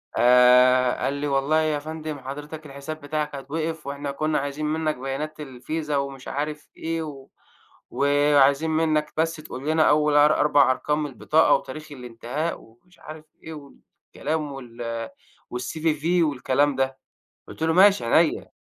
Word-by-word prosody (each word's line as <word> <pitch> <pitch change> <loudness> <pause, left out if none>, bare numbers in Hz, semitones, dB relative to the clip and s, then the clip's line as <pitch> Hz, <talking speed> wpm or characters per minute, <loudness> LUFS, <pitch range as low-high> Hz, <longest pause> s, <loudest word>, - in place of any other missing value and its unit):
آآ، 125 +1 +5
قال 135 - 0
لي 140 +1 -3
والله 140 +3 +2
يا 155 -2 0
فندم 155 -1 -6
حضرتك 145 +4 -8
الحساب 140 +2 -8
بتاعك 150 0 -3
هيتوقف، 155 +2 -4
وإحنا 140 0 -4
كنا 155 +2 -1
عايزين 145 +2 -4
منك 155 0 -1
بيانات 135 +4 -5
الفيزا 150 +2 -4
ومش 140 -1 -5
عارف 150 +1 -4
إيه 165 0 -3
و 140 -3 -9 0.6
وعايزين 145 +1 +3
منك 155 -1 0
بس 165 +1 +1
تقول 150 -2 -7
لنا 160 0 +3
أول 150 0 +3
أر 150 +1 +5
أربع 145 -2 +4
أرقام 150 +3 -1
من 145 - -4
البطاقة 155 +6 +2
وتاريخ 150 +3 -7
الانتهاء، 125 +4 -5
ومش 120 +11 -23
عارف 155 0 -11 0.2
إيه 160 - -8
والكلام 150 +1 -6
وال 115 -3 -6 0.4
وال 125 - -5
CVV 155 +2 -2 0.2
والكلام 145 0 +1
ده، 135 0 -1 0.5
قلت - - -9
له: 160 - +2
"ماشي 195 +1 +5
عينيا." 160 +6 +2
145 Hz, 150 wpm, -24 LUFS, 135-155 Hz, 0.6 s, آآ